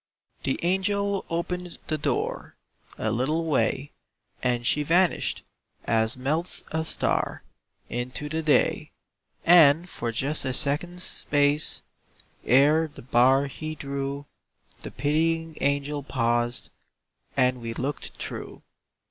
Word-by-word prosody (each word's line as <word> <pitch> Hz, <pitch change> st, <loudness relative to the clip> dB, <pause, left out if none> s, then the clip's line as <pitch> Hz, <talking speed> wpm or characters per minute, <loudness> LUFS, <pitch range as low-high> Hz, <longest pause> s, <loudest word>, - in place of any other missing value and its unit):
The 135 Hz, -, -1 dB
angel 200 Hz, +2 st, 0 dB
opened 175 Hz, +1 st, -3 dB
the 155 Hz, -, -1 dB
door -, -, -2 dB, 0.4 s
A 110 Hz, -, -1 dB
little 150 Hz, +8 st, 0 dB
way, 135 Hz, -1 st, 0 dB, 0.5 s
And 120 Hz, -1 st, 0 dB
she 150 Hz, -, +2 dB
vanished, 170 Hz, +4 st, +1 dB, 0.4 s
as 110 Hz, +1 st, +1 dB
melts 155 Hz, +7 st, -1 dB
a 160 Hz, 0 st, 0 dB
star, -, -, -1 dB, 0.4 s
Into 125 Hz, +4 st, -4 dB
the 160 Hz, +2 st, -2 dB
day, 155 Hz, -2 st, +2 dB, 0.6 s
And, 165 Hz, -1 st, +7 dB
for 120 Hz, -9 st, -4 dB
just 140 Hz, +6 st, +1 dB
a 130 Hz, -2 st, -1 dB
second's 175 Hz, +7 st, +1 dB
space, 145 Hz, +1 st, +1 dB, 0.6 s
Ere 150 Hz, +6 st, +4 dB
the 145 Hz, -, -13 dB
bar 130 Hz, +3 st, +4 dB
he 155 Hz, +3 st, -6 dB
drew, 140 Hz, 0 st, -4 dB, 0.6 s
The -, -, -6 dB
pitying 160 Hz, +3 st, 0 dB
angel 140 Hz, +1 st, 0 dB
paused, 120 Hz, -3 st, 0 dB, 0.7 s
And 125 Hz, -1 st, +2 dB
we 115 Hz, 0 st, -5 dB
looked 135 Hz, +3 st, -4 dB
through. -, -, -7 dB
145 Hz, 115 wpm, -26 LUFS, 130-160 Hz, 0.7 s, And